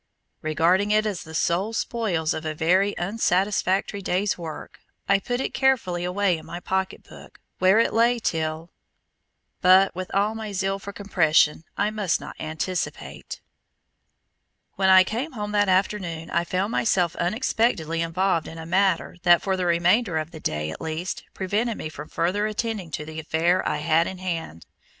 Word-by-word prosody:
Regarding 170 +6 +2
it 215 +1 +3
as 205 -5 -2
the 160 0 -10
sole 185 +7 0
spoils 200 -9 -1
of 160 - -5
a 155 -1 -3
very 185 +6 +2
unsatisfactory 195 0 0
day's 190 +2 0
work, 165 -3 -8 0.3
I 195 0 +4
put 245 +4 -3
it - - -3
carefully 235 -10 +1
away 180 -1 +1
in - - -13
my 175 - -6
pocket 190 +1 -2
book, - - -15 0.2
where 190 +3 +5
it 230 - +3
lay 235 +2 +3
till 160 -5 -2 0.9
But 185 +2 +6
with 185 +1 -5
all 205 +2 +1
my 220 -2 -6
zeal 195 +1 -1
for 200 0 -7
compression, 165 -6 +2
I 205 +1 +1
must 205 -5 0
not - - -9
anticipate. 160 +4 -4 1.3
When 190 -1 +2
I 185 0 +8
came 240 +11 -4
home 210 -3 -4
that 205 -1 +2
afternoon 185 -4 0
I 170 +1 +1
found 185 +5 -1
myself 180 -8 +1
unexpectedly 175 - 0
involved 165 0 0
in 165 - -9
a 160 - -7
matter 185 0 +1
that 175 -1 +5
for 190 -1 0
the 185 -1 -1
remainder 175 +3 +2
of 155 +1 -3
the 160 - -9
day 75 - -2
at - - -9
least, 160 +3 -4
prevented 210 +5 -1
me 155 - -5
from 150 -1 -9
further 200 +5 0
attending 215 -4 -3
to 150 0 -5
the 160 0 -7
affair 165 +3 +1
I - - -1
had 160 +3 +2
in 190 - -6
hand. 165 - -5
185 Hz, 170 wpm, -24 LUFS, 165-205 Hz, 1.3 s, I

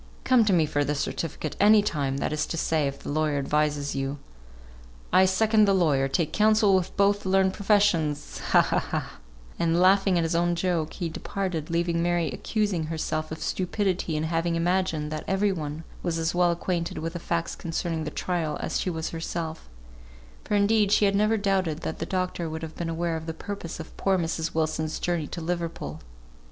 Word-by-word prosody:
Come 255 -3 +5
to 205 - +2
me 170 -4 +4
for 145 -1 0
the 150 +1 -1
certificate 155 +1 -3
any 210 +1 +6
time; 140 -8 -1
that 145 - -1
is 155 - -1
to 165 - -4
say, 160 -3 +1
if 140 - -4
the - - -4
lawyer 155 -1 +1
advises 145 0 0
you. 135 +1 -2 1.0
I 190 - +7
second 215 +3 +4
the 200 -1 +3
lawyer; 145 -7 +2
take 155 +3 -1
counsel 215 -1 +4
with 185 -1 0
both 200 +1 +3
the 190 - -4
learned 190 0 +3
professions 195 -8 +1
ha, - - +6
ha, - - +1
ha, - - -5 0.2
" - - -22
And 170 0 +2
laughing 190 0 +4
at 170 - +2
his 165 +1 -1
own 175 +1 +2
joke, 170 -3 -1
he 175 - -3
departed, 165 -1 -4
leaving 170 0 0
Mary 170 -3 +1
accusing 195 - -1
herself 155 -1 -3
of 160 - -5
stupidity 185 -3 -1
in 155 - -1
having 165 +1 0
imagined 165 -3 0
that 155 -1 -4
every 195 +1 +2
one 155 -3 -4 0.2
was 170 -2 -1
as 160 0 0
well 175 0 +3
acquainted 170 0 -2
with 165 +1 -4
the 175 - -4
facts 170 0 -2
concerning 165 -1 -3
the 155 - -3
trial 165 -1 -2
as - - -2
she - - -1
was 160 -2 -3
herself; 165 - -5 0.7
for 210 - -1
indeed 205 0 +3
she 210 - +4
had 200 0 +2
never 215 +2 +3
doubted 190 -6 0
that 160 - -4
the 165 - -3
doctor 185 -3 -2
would 160 +1 -5
have 160 -1 -7
been 170 -1 -3
aware 165 0 -1
of 160 0 -8
the 160 - -4
purpose 200 -2 -6
of 160 - -9
poor 195 -1 +2
Mrs. 165 -2 -2
Wilson's 155 0 -1
journey 170 -4 -1
to 170 - -6
Liverpool. 165 - -4
170 Hz, 200 wpm, -26 LUFS, 155-190 Hz, 1.0 s, I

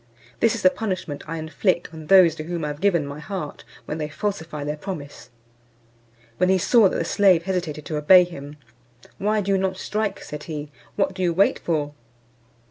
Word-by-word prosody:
This 230 +1 +3
is 225 - -6
the 185 - +6
punishment 185 -10 -4
I 165 - -3
inflict 165 +3 -1
on 160 -1 -9
those 185 -3 +7
to 155 - -7
whom 170 -2 -3
I - - -2
have 145 +2 -7
given 175 -7 +2
my 140 +1 -7
heart, 165 -2 -6 0.2
when 155 - -4
they 150 -1 -3
falsify 160 -3 -4
their 150 +1 -2
promise." 150 -3 -8 1.1
When 180 0 +2
he 190 - +4
saw 210 +2 +5
that - - -3
the 165 - -1
slave 185 -3 +4
hesitated 170 -5 -3
to 155 - -3
obey 180 +5 +7
him, 150 -4 -9 0.6
"Why 210 +2 +1
do 200 0 -2
you 195 - +3
not 190 0 -1
strike?" 210 0 -3
said 150 0 -8
he. 150 -2 -6 0.2
"What 195 -1 +1
do 185 - -6
you 175 -2 +2
wait 195 +4 +3
for?" 150 -3 -2
170 Hz, 200 wpm, -23 LUFS, 150-195 Hz, 1.1 s, those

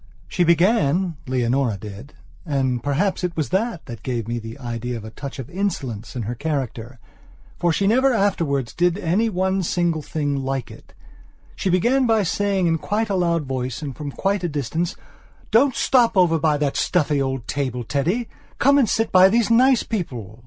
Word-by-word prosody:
She 180 - +1
began, 175 -1 +2
Leonora 125 -2 0
didand 125 - -4
perhaps 165 - 0
it 175 -2 -2
was 155 - -1
that 195 -1 -1
that 115 -6 -8
gave 115 0 -3
me 120 0 -2
the 115 +2 -8
idea 120 -1 -4
of 110 - -8
a 110 - -8
touch 135 +4 -7
of 130 -4 -6
insolence 140 - -4
in 120 - -3
her 115 +4 -3
character, 130 -3 -4 0.6
for 175 - +2
she 195 +5 0
never 260 +6 +4
afterwards 165 - 0
did 175 0 +1
any 205 +5 +1
one 190 0 0
single 170 -2 0
thing 145 -1 -2
like 135 -1 -3
itshe 190 - -9
began 245 +9 +3
by 220 -2 +3
saying 195 +1 0
in 165 -1 +1
quite 215 +5 -1
a - - +1
loud 170 -4 +1
voice 130 +1 -4
and 140 -3 -5
from 150 -2 -5
quite 195 +6 -1
a 175 - 0
distance: 160 +5 -2 0.6
"Don't 255 +3 +4
stop 240 -5 +3
over 170 -3 +4
by 155 -1 +2
that 145 -2 -1
stuffy 150 -5 +1
old 135 -3 -3
table, 130 -4 -2
Teddy. 170 - -1 0.3
Come 280 +2 +4
and 240 -7 +3
sit 225 - 0
by 185 +1 +7
these 230 +2 +2
nice 255 +1 +5
people!" 120 - -5
160 Hz, 180 wpm, -22 LUFS, 130-195 Hz, 0.6 s, by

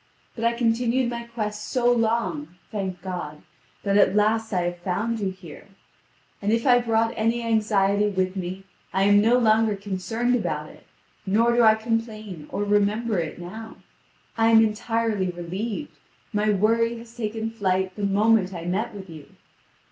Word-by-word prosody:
But 230 - -6
I 235 - +3
continued 235 +1 +1
my 235 0 -5
quest 210 -3 -4
so 245 -2 +1
long, 220 -9 0 0.2
thank 190 -4 -4
God, 175 -5 -6 0.4
that 200 0 +2
at 200 -1 +4
last 220 +1 +2
I 185 -3 +1
have 175 0 -3
found 205 +6 -2
you 200 -2 -1
here. 180 -5 -11 0.7
And 205 +1 0
if 230 +1 +1
I 245 -2 +6
brought 225 -1 +1
any 230 +2 0
anxiety 210 -2 +2
with 185 -2 -1
me, 185 +1 -5 0.3
I 190 - +2
am 205 +1 +5
no 230 +3 +4
longer 220 -2 +3
concerned 200 +5 -2
about 245 - -2
it, - - -19 0.4
nor 230 +4 +3
do 240 - +4
I 220 -1 +6
complain 220 -7 -4
or 205 - -2
remember 205 +1 +1
it 160 -2 -4
now. 220 +6 -8 0.6
I 225 - +4
am 225 0 +6
entirely 220 -2 -1
relieved; 190 - -5 0.3
my 210 +1 +1
worry 230 +3 +2
has 230 0 -13
taken 225 -1 -3
flight 190 -4 -1
the 210 - -6
moment 200 -1 +2
I 170 -1 -6
met 205 +6 -2
with 195 -1 -8
you. 155 -4 -11
215 Hz, 165 wpm, -24 LUFS, 190-230 Hz, 0.7 s, I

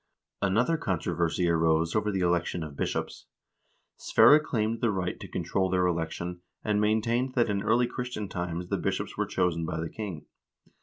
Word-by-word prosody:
Another 115 - +2
controversy 85 - 0
arose 80 0 +2
over 105 0 +1
the 95 -2 -1
election 85 -1 0
of 75 -2 -8
bishops. - - -3 0.7
Sverre 120 +7 +6
claimed 115 -6 -1
the 120 - +2
right 95 -3 -2
to - - -8
control 95 -1 -1
their 90 -1 +2
election, 85 +1 -2 0.2
and 105 -1 +1
maintained 115 +4 +1
that 120 -4 +2
in 100 -1 -1
early 115 +4 +3
Christian 125 -4 -4
times 85 -1 -4
the - - 0
bishops - - -2
were - - -1
chosen 90 -3 0
by 80 0 -3
the 80 0 -3
king. 100 -8 -6
95 Hz, 165 wpm, -28 LUFS, 85-110 Hz, 0.7 s, Sverre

